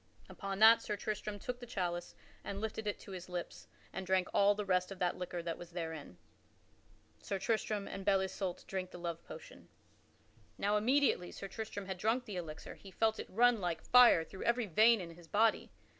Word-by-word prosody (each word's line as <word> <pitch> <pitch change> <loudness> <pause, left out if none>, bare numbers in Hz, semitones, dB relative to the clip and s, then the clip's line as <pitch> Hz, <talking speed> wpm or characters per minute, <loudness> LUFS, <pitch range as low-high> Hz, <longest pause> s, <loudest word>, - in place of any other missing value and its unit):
Upon 195 -1 -5
that 225 +2 +8
Sir 210 - -3
Tristram 210 0 -4
took 245 +4 -5
the 245 - -9
chalice 175 -4 -3 0.3
and 200 - -5
lifted 220 0 -4
it 205 - -1
to - - -11
his 185 -1 -7
lips, 175 -1 -6 0.3
and 190 - -4
drank 185 -1 +1
all 200 +1 +5
the 210 0 -3
rest 185 0 +1
of 195 - -6
that 180 -1 0
liquor 180 -1 -5
that 165 -1 -4
was 175 -1 -10
therein. 160 - -6 1.0
[Sidenote: - - -27
Sir 195 - -1
Tristram 215 0 -1
and 195 - -6
Belle 195 0 +3
Isoult 190 -1 -4
drink 185 -1 -4
the - - -10
love 170 -1 -5
potion] - - -11 0.9
Now 205 +1 +1
immediately 240 -4 +2
Sir 195 - -7
Tristram 210 -1 -6
had 190 -1 -5
drunk 230 +5 +1
that 210 - -7
elixir 160 -3 -6
he 195 - -13
felt 220 +3 +1
it - - -5
run 235 +1 +4
like 175 -2 -2
fire 245 -9 +7
through 190 +4 -11
every 235 0 +2
vein 220 +5 +5
in 170 -2 -7
his 170 0 -15
body. 220 +5 +2
195 Hz, 205 wpm, -34 LUFS, 180-220 Hz, 1.0 s, that